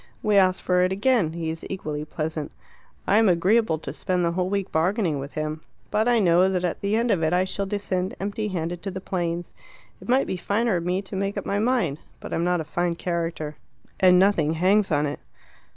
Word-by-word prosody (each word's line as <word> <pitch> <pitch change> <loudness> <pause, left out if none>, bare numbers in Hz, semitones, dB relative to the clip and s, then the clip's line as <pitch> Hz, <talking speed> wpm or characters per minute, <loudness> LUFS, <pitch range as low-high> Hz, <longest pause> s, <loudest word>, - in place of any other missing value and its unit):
We 210 -1 +2
ask 185 -1 +4
for 180 0 +2
it 185 +1 +2
again. 200 -4 +2
He 165 -1 -3
is 165 - -7
equally 150 -6 -4
pleasant. 155 -1 -4 0.5
I'm 215 +1 +4
agreeable 185 +1 +3
to 155 - -7
spend 180 -2 -1
the 170 - +1
whole 180 +1 -1
week 200 -1 -2
bargaining 170 - +1
with 140 +1 -7
him. 155 0 -3 0.3
But 215 +2 +2
I 240 -1 +4
know 180 -2 +4
that 185 -1 -1
at 180 - -2
the 200 +2 0
end 230 +1 +1
of 185 -5 +1
it 160 +1 +1
I 180 +1 +3
shall 195 +1 -3
descend 190 -2 -2
empty 205 +2 -2
handed 175 -2 -3
to 195 - -4
the 190 0 -5
plains. 175 -2 -3 0.5
It - - -12
might 260 +2 +4
be 185 - -3
finer 205 +2 0
of 170 - -4
me 180 +2 0
to 195 - -8
make 195 +1 -2
up - - -3
my 200 - 0
mind. 215 - +1 0.2
But - - -7
I'm 165 - 0
not 180 0 +1
a - - -3
fine 175 +2 -1
character. 165 -3 -3 0.4
And 180 -1 +6
nothing 175 -5 +3
hangs 195 +5 +3
on 145 0 +2
it." 145 0 -4
180 Hz, 220 wpm, -24 LUFS, 165-200 Hz, 0.5 s, And